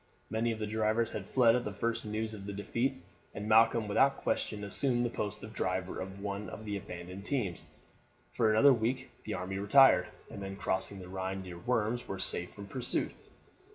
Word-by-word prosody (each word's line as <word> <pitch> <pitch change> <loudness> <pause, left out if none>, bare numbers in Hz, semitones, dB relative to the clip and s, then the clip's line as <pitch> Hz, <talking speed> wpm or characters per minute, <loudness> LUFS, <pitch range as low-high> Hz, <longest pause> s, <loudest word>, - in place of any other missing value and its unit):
Many 115 +1 +1
of 110 - -3
the 110 - -2
drivers 110 +2 +1
had 100 -2 -6
fled 120 -3 +5
at 125 - 0
the 105 - -3
first 115 +3 -2
news 110 +1 -2
of 100 -2 -8
the 100 - -4
defeat, 120 +6 -2 0.3
and 105 - -4
Malcolm 115 0 +5
without 135 +7 +3
question 105 -1 -2
assumed 120 +4 +1
the 120 - -1
post 105 -1 -4
of 110 +1 -8
driver 95 -2 -2
of 95 +1 -6
one 100 +1 -3
of 110 - -8
the 105 -1 -3
abandoned 90 0 -7
teams. 105 - -2 0.6
For 115 -2 +2
another 120 +6 +6
week 125 +3 -1
the 110 - -2
army 95 +1 -4
retired, 100 -3 +6 0.2
and - - -7
then 95 0 -5
crossing 100 0 +1
the 90 -1 -9
Rhine 95 +1 -4
near 90 -2 -8
Worms 120 +3 0
were 95 - -4
safe 90 -1 0
from 100 - -9
pursuit. 125 +5 -1
105 Hz, 195 wpm, -32 LUFS, 95-115 Hz, 0.6 s, another